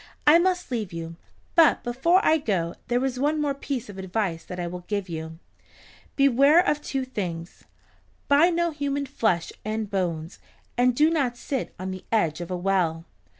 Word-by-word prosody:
I 310 Hz, +3 st, +7 dB
must 360 Hz, -3 st, 0 dB
leave 220 Hz, -6 st, -2 dB
you, 165 Hz, 0 st, -6 dB, 0.4 s
but 330 Hz, -3 st, +5 dB
before 335 Hz, +10 st, +2 dB
I 320 Hz, 0 st, +4 dB
go 175 Hz, -, -1 dB
there 245 Hz, +2 st, +1 dB
is 255 Hz, -1 st, -2 dB
one 300 Hz, +3 st, +1 dB
more 290 Hz, -2 st, 0 dB
piece 275 Hz, -3 st, -4 dB
of 195 Hz, -2 st, -9 dB
advice 185 Hz, -3 st, -2 dB
that 180 Hz, -, -7 dB
I 175 Hz, -, -2 dB
will 180 Hz, +1 st, -6 dB
give 200 Hz, -2 st, -2 dB
you. 160 Hz, -1 st, -6 dB, 0.8 s
Beware 275 Hz, +3 st, +5 dB
of 295 Hz, 0 st, +1 dB
two 270 Hz, -3 st, -3 dB
things. 175 Hz, -8 st, -6 dB, 0.6 s
Buy 290 Hz, +5 st, +5 dB
no 340 Hz, -1 st, 0 dB
human 285 Hz, -1 st, -2 dB
flesh 220 Hz, -11 st, 0 dB
and 215 Hz, -1 st, -3 dB
bones, 170 Hz, -3 st, -2 dB, 0.4 s
and 245 Hz, 0 st, +3 dB
do 305 Hz, +4 st, +4 dB
not 265 Hz, -7 st, 0 dB
sit 265 Hz, +1 st, -4 dB
on 185 Hz, +1 st, -4 dB
the 185 Hz, 0 st, -7 dB
edge 170 Hz, -8 st, +1 dB
of 175 Hz, -, -6 dB
a 180 Hz, -, -2 dB
well." 175 Hz, -3 st, 0 dB
230 Hz, 180 wpm, -25 LUFS, 180-285 Hz, 0.8 s, I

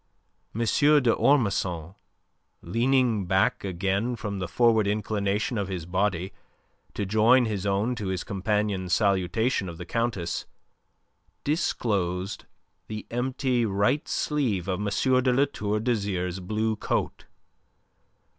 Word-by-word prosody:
M. 115 Hz, -, -2 dB
d'Ormesson, 115 Hz, -, +2 dB, 0.7 s
leaning 115 Hz, 0 st, +1 dB
back 95 Hz, +1 st, +2 dB
again 100 Hz, +5 st, -1 dB
from 105 Hz, -3 st, -4 dB
the 90 Hz, -, -3 dB
forward 110 Hz, +1 st, +3 dB
inclination 105 Hz, +1 st, -1 dB
of 100 Hz, -, -2 dB
his 90 Hz, -4 st, -4 dB
body 95 Hz, 0 st, -1 dB, 0.6 s
to 100 Hz, -, -2 dB
join 110 Hz, +5 st, +4 dB
his 105 Hz, -3 st, -2 dB
own 100 Hz, +5 st, +1 dB
to 110 Hz, -5 st, -4 dB
his 95 Hz, -2 st, -2 dB
companion's 100 Hz, -2 st, -1 dB
salutation 100 Hz, +1 st, +1 dB
of 85 Hz, -, -8 dB
the 90 Hz, -, -7 dB
Countess, 115 Hz, -5 st, -2 dB, 1.0 s
disclosed 100 Hz, -, -1 dB, 0.4 s
the 110 Hz, -1 st, -6 dB
empty 125 Hz, 0 st, 0 dB
right 105 Hz, +7 st, +1 dB
sleeve 120 Hz, -, -1 dB
of 95 Hz, 0 st, -1 dB
M. 105 Hz, -, -2 dB, 0.4 s
de 130 Hz, -, +3 dB
La 135 Hz, +3 st, +4 dB
Tour 105 Hz, -6 st, -2 dB
d'Azyr's 100 Hz, -6 st, -1 dB
blue 110 Hz, +4 st, -1 dB
coat. -, -, -2 dB
105 Hz, 120 wpm, -26 LUFS, 95-120 Hz, 1.0 s, join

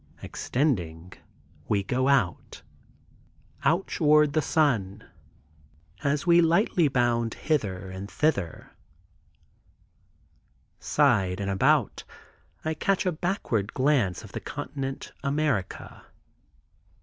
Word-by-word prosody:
Extending, 90 Hz, -, -2 dB, 0.5 s
we 100 Hz, -2 st, +1 dB
go 130 Hz, +6 st, 0 dB
out, 130 Hz, -11 st, 0 dB, 1.0 s
out 170 Hz, +4 st, +2 dB
toward 150 Hz, -2 st, +3 dB
the 155 Hz, -, +2 dB
sun. 110 Hz, -11 st, 0 dB, 1.0 s
As 145 Hz, +1 st, 0 dB
we 170 Hz, 0 st, +6 dB
lightly 170 Hz, 0 st, +3 dB
bound 120 Hz, -3 st, 0 dB
hither 95 Hz, -, -2 dB
and 95 Hz, +2 st, -7 dB
thither, 100 Hz, -, -1 dB, 2.1 s
side 105 Hz, -11 st, +2 dB
and 100 Hz, -1 st, -2 dB
about, 95 Hz, -, +2 dB, 0.6 s
I 160 Hz, -, 0 dB
catch 195 Hz, +5 st, 0 dB
a 180 Hz, -, +2 dB
backward 155 Hz, -, -2 dB
glance 130 Hz, -, +1 dB
of -, -, -12 dB
the -, -, -5 dB
continent 135 Hz, -1 st, -6 dB
America. 140 Hz, -8 st, -2 dB
135 Hz, 95 wpm, -26 LUFS, 100-155 Hz, 2.1 s, we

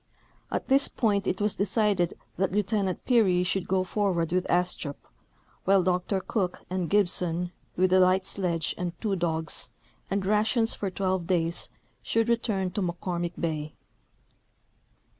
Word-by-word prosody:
At -, -, -2 dB
this 275 Hz, 0 st, +4 dB
point 200 Hz, -4 st, 0 dB
it 185 Hz, -, 0 dB
was 210 Hz, 0 st, +1 dB
decided 200 Hz, -3 st, +1 dB, 0.2 s
that 190 Hz, 0 st, 0 dB
Lieutenant 200 Hz, -2 st, 0 dB
Peary 195 Hz, -8 st, +4 dB
should 180 Hz, 0 st, -1 dB
go 185 Hz, 0 st, +2 dB
forward 185 Hz, -4 st, 0 dB
with 180 Hz, 0 st, 0 dB
Astrup, 175 Hz, -5 st, 0 dB, 0.7 s
Avhile 195 Hz, -1 st, +5 dB
Dr 180 Hz, +2 st, 0 dB
Cook 185 Hz, -3 st, -2 dB
and 185 Hz, -3 st, -1 dB
Gibson, 180 Hz, -3 st, +1 dB, 0.2 s
with 185 Hz, +1 st, +3 dB
a 185 Hz, -, +6 dB
light 185 Hz, +1 st, +4 dB
sledge 170 Hz, -5 st, -1 dB
and 175 Hz, -1 st, -4 dB
two 210 Hz, -3 st, 0 dB
dogs, 160 Hz, -2 st, -1 dB, 0.4 s
and 195 Hz, 0 st, -1 dB
rations 220 Hz, +3 st, +2 dB
for 200 Hz, -, -3 dB
twelve 185 Hz, -2 st, -1 dB
days, 170 Hz, -2 st, 0 dB, 0.3 s
should 225 Hz, +1 st, +1 dB
return 210 Hz, -5 st, 0 dB
to 205 Hz, -, -2 dB
JMcCormick 175 Hz, -1 st, -3 dB
bay. 155 Hz, -2 st, -3 dB
185 Hz, 140 wpm, -27 LUFS, 175-200 Hz, 0.7 s, a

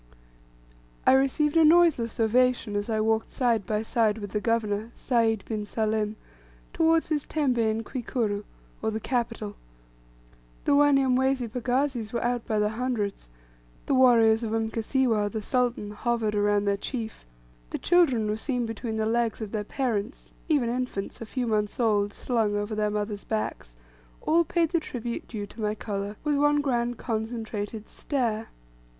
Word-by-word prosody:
I -, -, +7 dB
received 275 Hz, +3 st, +3 dB
a 325 Hz, -, +6 dB
noiseless 310 Hz, -9 st, +4 dB
ovation 240 Hz, -1 st, +2 dB
as 205 Hz, +2 st, -2 dB
I 220 Hz, -1 st, +1 dB
walked 220 Hz, +1 st, +1 dB
side 235 Hz, -6 st, 0 dB
by 215 Hz, 0 st, 0 dB
side 220 Hz, -1 st, +1 dB
with 205 Hz, -3 st, -6 dB
the 210 Hz, -, -1 dB
governor, 220 Hz, -1 st, 0 dB
Sayd 225 Hz, -4 st, +1 dB
bin 215 Hz, -2 st, -3 dB
Salim, 215 Hz, 0 st, -1 dB, 0.6 s
towards 325 Hz, 0 st, +3 dB
his 300 Hz, -2 st, -1 dB
tembe 275 Hz, -6 st, 0 dB
in 220 Hz, 0 st, +1 dB
Kwikuru, 225 Hz, -4 st, -2 dB, 0.4 s
or 220 Hz, -, 0 dB
the 220 Hz, 0 st, -2 dB
capital. 230 Hz, -3 st, -2 dB, 1.1 s
The -, -, +2 dB
Wanyamwezi 270 Hz, -3 st, +3 dB
pagazis 250 Hz, -1 st, -1 dB
were 235 Hz, -, -1 dB
out 240 Hz, -1 st, -1 dB
by 215 Hz, -1 st, +1 dB
hundreds, 220 Hz, -, -3 dB, 0.6 s
the -, -, 0 dB
warriors 235 Hz, -4 st, +5 dB
of 225 Hz, -2 st, -3 dB
Mkasiwa, 225 Hz, 0 st, +1 dB
the 220 Hz, 0 st, -4 dB
sultan, 245 Hz, -3 st, 0 dB
hovered 225 Hz, 0 st, -1 dB
around 205 Hz, 0 st, +2 dB
their 200 Hz, 0 st, +1 dB
chief, 225 Hz, 0 st, -5 dB, 0.5 s
the -, -, -3 dB
children 285 Hz, -11 st, +3 dB
were 210 Hz, 0 st, -1 dB
seen 245 Hz, 0 st, -1 dB
between 225 Hz, 0 st, -4 dB
the 220 Hz, -, 0 dB
legs 230 Hz, 0 st, 0 dB
of 215 Hz, -3 st, -5 dB
their 215 Hz, -2 st, -2 dB
parents, 230 Hz, 0 st, -3 dB, 0.2 s
even 285 Hz, -6 st, +3 dB
infants, 240 Hz, -5 st, -3 dB
a 230 Hz, -, -6 dB
few 255 Hz, +2 st, -2 dB
months 210 Hz, -1 st, -1 dB
old, 205 Hz, -3 st, +2 dB
slung 220 Hz, -2 st, 0 dB
over 205 Hz, +1 st, -2 dB
their 210 Hz, 0 st, 0 dB
mothers' 210 Hz, 0 st, -3 dB
backs, 215 Hz, -, -4 dB, 0.5 s
all 335 Hz, +2 st, +4 dB
paid 335 Hz, 0 st, +1 dB
the 340 Hz, -, +1 dB
tribute 240 Hz, -6 st, -5 dB
due 210 Hz, -3 st, -5 dB
to 220 Hz, +2 st, -11 dB
my 210 Hz, 0 st, 0 dB
colour, 205 Hz, -1 st, -4 dB
with 295 Hz, -1 st, +1 dB
one 290 Hz, +1 st, +3 dB
grand 245 Hz, -4 st, 0 dB
concentrated 220 Hz, -2 st, -4 dB
stare. 230 Hz, -6 st, -2 dB
225 Hz, 155 wpm, -27 LUFS, 215-255 Hz, 1.1 s, I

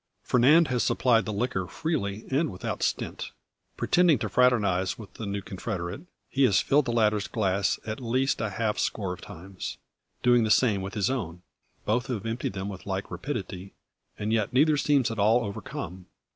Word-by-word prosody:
Fernand 150 Hz, +6 st, +5 dB
has 125 Hz, -2 st, +1 dB
supplied 115 Hz, -5 st, +3 dB
the 105 Hz, -, -3 dB
liquor 100 Hz, -4 st, -1 dB
freely 110 Hz, -, -3 dB
and 145 Hz, +1 st, +1 dB
without 90 Hz, -, -5 dB
stint. -, -, -2 dB, 0.5 s
Pretending 175 Hz, -5 st, +4 dB
to 110 Hz, -1 st, -3 dB
fraternise 100 Hz, -6 st, +2 dB
with 110 Hz, -4 st, -11 dB
the 110 Hz, -, -6 dB
new 100 Hz, 0 st, -3 dB
confederate, 95 Hz, -, -5 dB, 0.3 s
he 140 Hz, -, -2 dB
has 100 Hz, -6 st, +4 dB
filled 145 Hz, 0 st, +3 dB
the 120 Hz, -, -1 dB
latter's 105 Hz, -3 st, +2 dB
glass 100 Hz, -3 st, 0 dB
at 110 Hz, +2 st, -4 dB
least 130 Hz, +2 st, 0 dB
a 110 Hz, -, -1 dB
half 105 Hz, +1 st, -1 dB
score 95 Hz, -4 st, -1 dB
of -, -, -11 dB
times, 95 Hz, +3 st, -8 dB, 0.5 s
doing 120 Hz, -1 st, +5 dB
the 110 Hz, -, 0 dB
same 105 Hz, -4 st, +3 dB
with 95 Hz, 0 st, -6 dB
his 105 Hz, +3 st, +1 dB
own. 90 Hz, -9 st, -4 dB, 0.4 s
Both 120 Hz, +4 st, 0 dB
have 115 Hz, -5 st, -3 dB
emptied 115 Hz, -2 st, -2 dB
them 95 Hz, 0 st, -4 dB
with 95 Hz, -1 st, -8 dB
like 95 Hz, 0 st, -3 dB
rapidity, 95 Hz, -2 st, -5 dB, 0.4 s
and 105 Hz, +1 st, -2 dB
yet 110 Hz, -2 st, +1 dB
neither 150 Hz, +4 st, +4 dB
seems 140 Hz, -4 st, +2 dB
at 115 Hz, -, -5 dB
all 110 Hz, +4 st, +4 dB
overcome. 95 Hz, -2 st, -6 dB
110 Hz, 180 wpm, -27 LUFS, 95-125 Hz, 0.5 s, Fernand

